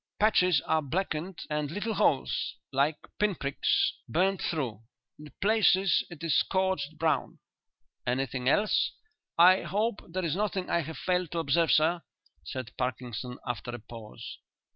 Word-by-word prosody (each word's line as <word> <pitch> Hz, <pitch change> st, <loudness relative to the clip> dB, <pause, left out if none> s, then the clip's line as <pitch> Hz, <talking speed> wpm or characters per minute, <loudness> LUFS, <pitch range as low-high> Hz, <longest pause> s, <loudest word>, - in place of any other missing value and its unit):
"Patches 180 Hz, -7 st, +4 dB
are 160 Hz, -, +2 dB
blackened, 165 Hz, +3 st, -3 dB
and 150 Hz, -1 st, -2 dB
little 205 Hz, +7 st, -2 dB
holes 140 Hz, -8 st, +1 dB, 0.2 s
like 140 Hz, +3 st, +2 dB, 0.2 s
pinpricks 175 Hz, -10 st, +1 dB, 0.2 s
burned 190 Hz, +3 st, +1 dB
through. 125 Hz, -, -2 dB, 0.4 s
In 150 Hz, -1 st, -11 dB
places 195 Hz, -3 st, +4 dB
it 170 Hz, -1 st, -10 dB
is 165 Hz, -, +3 dB
scorched 190 Hz, -6 st, 0 dB
brown." 155 Hz, -3 st, 0 dB, 0.7 s
"Anything 130 Hz, 0 st, 0 dB
else?" 210 Hz, +8 st, +2 dB, 0.4 s
"I 180 Hz, +2 st, +7 dB
hope 210 Hz, +1 st, -1 dB
there 185 Hz, +1 st, -2 dB
is 160 Hz, -1 st, 0 dB
nothing 195 Hz, -2 st, -2 dB
I -, -, +3 dB
have 160 Hz, +1 st, -7 dB
failed 180 Hz, -2 st, 0 dB
to -, -, -2 dB
observe, 165 Hz, +1 st, +2 dB
sir," 165 Hz, +3 st, +3 dB, 0.4 s
said 125 Hz, +9 st, -6 dB
Parkinson, 125 Hz, -1 st, -3 dB
after 125 Hz, -1 st, -4 dB
a -, -, -7 dB
pause. 110 Hz, -1 st, -10 dB
160 Hz, 140 wpm, -29 LUFS, 135-185 Hz, 0.7 s, I